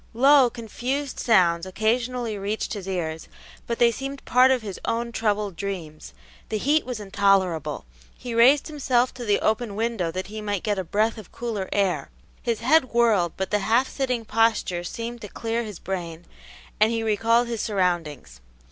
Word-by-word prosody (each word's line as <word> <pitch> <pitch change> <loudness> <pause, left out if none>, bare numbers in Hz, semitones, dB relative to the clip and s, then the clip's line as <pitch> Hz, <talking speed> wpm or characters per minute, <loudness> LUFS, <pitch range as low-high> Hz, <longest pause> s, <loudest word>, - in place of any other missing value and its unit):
Low, 270 +1 +6
confused 245 +4 -4
sounds 180 -6 +3
occasionally 230 +3 -1
reached 205 +3 -3
his 200 -3 -6
ears, 160 -4 -3 0.4
but 235 - -2
they 235 -1 +5
seemed 270 +3 -6
part 255 +1 +5
of 255 -3 +2
his 200 -3 -6
own 235 +1 -2
troubled 210 -4 -1
dreams. 160 - -6 0.3
The 215 - -1
heat 290 +6 +1
was 250 -3 -4
intolerable; 195 - +1 0.3
he 245 - -6
raised 255 +5 +5
himself 255 -5 +1
to 245 - -7
the 205 -2 +2
open 220 -1 0
window 225 -5 -1
that 185 +3 -4
he 215 +1 -7
might 205 -3 -2
get 205 -2 0
a - - -1
breath 215 +5 0
of 210 - -13
cooler 220 -5 -4
air; 180 -8 0 0.3
his 230 -2 -2
head 275 +4 +4
whirled, 215 -8 +3
but 190 -1 -3
the 210 - +2
half 235 +6 +2
sitting 250 -4 -2
posture 220 -6 +1
seemed 230 +6 -6
to 210 - -6
clear 230 +3 -3
his 210 -5 -7
brain, 175 -3 -5 0.5
and 215 +2 +4
he 230 -1 -1
recalled 225 +2 +2
his 230 -2 -3
surroundings. 170 - -2
220 Hz, 175 wpm, -24 LUFS, 190-240 Hz, 0.5 s, Low